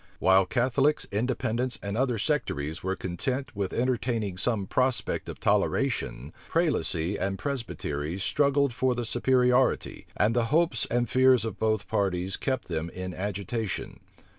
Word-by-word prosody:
While 95 +1 +4
Catholics, 135 +6 +2
Independents, 120 +2 -1
and 100 0 -3
other 125 -1 +1
sectaries 95 - -1
were 95 +1 -1
content 130 +10 -3
with 100 -2 -2
entertaining 115 -5 -1
some 100 +1 -1
prospect 125 -1 0
of - - -7
toleration, 70 +6 0 0.2
Prelacy 105 - +1
and 95 0 -1
Presbytery 90 - -3
struggled 140 +6 +2
for 130 +1 +1
the 120 -1 -2
superiority, 125 +1 +2
and 110 +3 +2
the 120 -1 +2
hopes 155 -2 +2
and 120 0 +1
fears 130 -1 +4
of 115 - -5
both 110 -1 0
parties 95 -3 0
kept 130 -3 -2
them 85 -1 -3
in 90 +1 -6
agitation. 100 +2 -4
115 Hz, 140 wpm, -27 LUFS, 95-130 Hz, 0.2 s, While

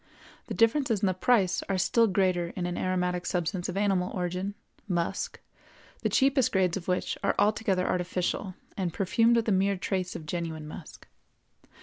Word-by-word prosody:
The - - -4
differences 230 -2 +2
in - - +2
the 185 - +2
price 190 -1 +2
are 195 - +1
still 230 +5 +3
greater 185 -3 +1
in 180 - -2
an 175 0 -2
aromatic 180 -1 -1
substance 175 0 -1
of 185 - -3
animal 195 -3 +1
origin, 180 +2 -2 0.3
musk, 175 -3 -2 0.6
the - - +1
cheapest 270 -2 +3
grades 185 -3 +2
of 190 -3 -6
which 180 0 -1
are - - +2
altogether 205 -3 +2
artificial 180 +1 -1 0.2
and 185 -3 -1
perfumed 230 +5 +3
with 230 -1 +1
a - - +3
mere 195 +1 +2
trace 185 -1 -2
of 155 - -6
genuine 160 -1 -4
musk. 155 +1 -10
185 Hz, 165 wpm, -28 LUFS, 180-205 Hz, 0.6 s, still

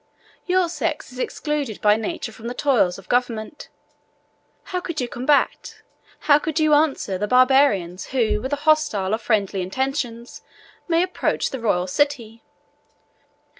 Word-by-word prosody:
Your 365 -1 +2
sex 330 -4 -3
is 250 - -10
excluded 290 -6 -3
by 210 0 +4
nature 225 +2 -4
from 225 +1 -10
the 245 - -5
toils 245 -12 +2
of 195 - -14
government. 245 +2 -2 0.9
How 365 - -3
could 335 -3 -5
you 250 - -1
combat, 260 +5 0 0.4
how 290 -1 +5
could 320 +1 -2
you 310 -1 +3
answer, 285 -11 +1
the 210 - -1
Barbarians, 250 -8 +3
who, 230 -5 0
with 260 - -5
hostile 290 -10 +1
or 220 - 0
friendly 200 -4 0
intentions, 245 +3 -3 0.5
may 335 0 +3
approach 365 - -1
the 265 - -5
royal 185 -6 0
city? 230 0 -1
250 Hz, 140 wpm, -22 LUFS, 215-295 Hz, 0.9 s, how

